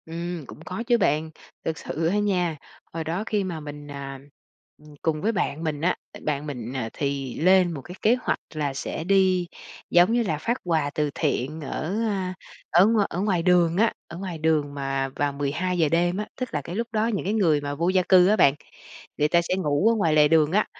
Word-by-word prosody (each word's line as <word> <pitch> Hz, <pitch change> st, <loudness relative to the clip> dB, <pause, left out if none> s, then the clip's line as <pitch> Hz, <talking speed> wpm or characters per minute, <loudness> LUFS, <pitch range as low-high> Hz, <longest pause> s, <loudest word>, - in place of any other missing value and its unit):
Ừm, 170 Hz, 0 st, -5 dB
cũng -, -, -11 dB
có 185 Hz, +6 st, -4 dB
chứ 240 Hz, -2 st, +4 dB
bạn. 160 Hz, -5 st, +1 dB, 0.4 s
Thực 160 Hz, -1 st, -2 dB
sự 160 Hz, +2 st, -3 dB
á 180 Hz, -, +1 dB
nha, 180 Hz, -6 st, 0 dB, 0.4 s
hồi 165 Hz, 0 st, -3 dB
đó 170 Hz, +6 st, -2 dB
khi 210 Hz, -2 st, 0 dB
mà 175 Hz, -4 st, -4 dB
mình, 145 Hz, -1 st, -9 dB
à, 135 Hz, -1 st, -7 dB, 0.6 s
ừm, 150 Hz, -1 st, -15 dB
cùng 155 Hz, -2 st, 0 dB
với 220 Hz, -, +1 dB
bạn 160 Hz, -7 st, -2 dB
mình 150 Hz, -3 st, -2 dB
á, 180 Hz, +3 st, +2 dB, 0.2 s
tại -, -, -11 dB
bạn 150 Hz, 0 st, -1 dB
mình, 125 Hz, -4 st, -5 dB
à, 120 Hz, -4 st, -2 dB
thì 140 Hz, -3 st, -3 dB
lên 185 Hz, +1 st, +5 dB
một 140 Hz, -, -6 dB
cái 175 Hz, +7 st, -10 dB
kế 225 Hz, +3 st, +4 dB
hoạch -, -, -1 dB
là 145 Hz, -3 st, -2 dB
sẽ 135 Hz, -, -4 dB
đi, 185 Hz, -1 st, +3 dB, 0.4 s
giống 175 Hz, +5 st, +5 dB
như 240 Hz, 0 st, +2 dB
là, 160 Hz, -8 st, -1 dB
phát 235 Hz, +11 st, -1 dB
quà 160 Hz, -5 st, +1 dB
từ 150 Hz, -1 st, +1 dB
thiện 150 Hz, +6 st, -1 dB
ở, 155 Hz, +6 st, -3 dB
a, 190 Hz, -3 st, -2 dB, 0.4 s
ở 175 Hz, +3 st, +6 dB
ngoài 215 Hz, -3 st, +3 dB
ở 175 Hz, -, -3 dB
ngoài 190 Hz, -5 st, +1 dB
đường 175 Hz, -2 st, +3 dB
á. 225 Hz, +2 st, +3 dB
Ở 170 Hz, -, -9 dB
ngoài 185 Hz, -3 st, -5 dB
đường 155 Hz, -2 st, +1 dB
mà 135 Hz, -1 st, -2 dB
vào 145 Hz, 0 st, 0 dB
12:00 155 Hz, +4 st, 0 dB
đêm 175 Hz, +3 st, +1 dB
á, 210 Hz, -, -2 dB
tức 255 Hz, -1 st, -4 dB
là -, -, -1 dB
cái 175 Hz, -, -7 dB
lúc 230 Hz, +2 st, -2 dB
đó 220 Hz, 0 st, +1 dB
những 210 Hz, -6 st, -2 dB
cái 200 Hz, -, 0 dB
người 165 Hz, -9 st, +3 dB
mà 145 Hz, 0 st, -4 dB
vô 170 Hz, +4 st, 0 dB
gia 185 Hz, 0 st, +3 dB
cư 185 Hz, -1 st, +7 dB
á 210 Hz, -, +4 dB
bạn, 140 Hz, -9 st, +5 dB, 0.6 s
người 150 Hz, -, +3 dB
ta 170 Hz, +2 st, +3 dB
sẽ 170 Hz, +2 st, -1 dB
ngủ 150 Hz, +3 st, +2 dB
ở 230 Hz, -, +3 dB
ngoài 165 Hz, -8 st, +2 dB
lề 150 Hz, -1 st, +6 dB
đường 155 Hz, -1 st, +3 dB
á. 210 Hz, +3 st, +3 dB
165 Hz, 230 wpm, -25 LUFS, 150-190 Hz, 0.6 s, cư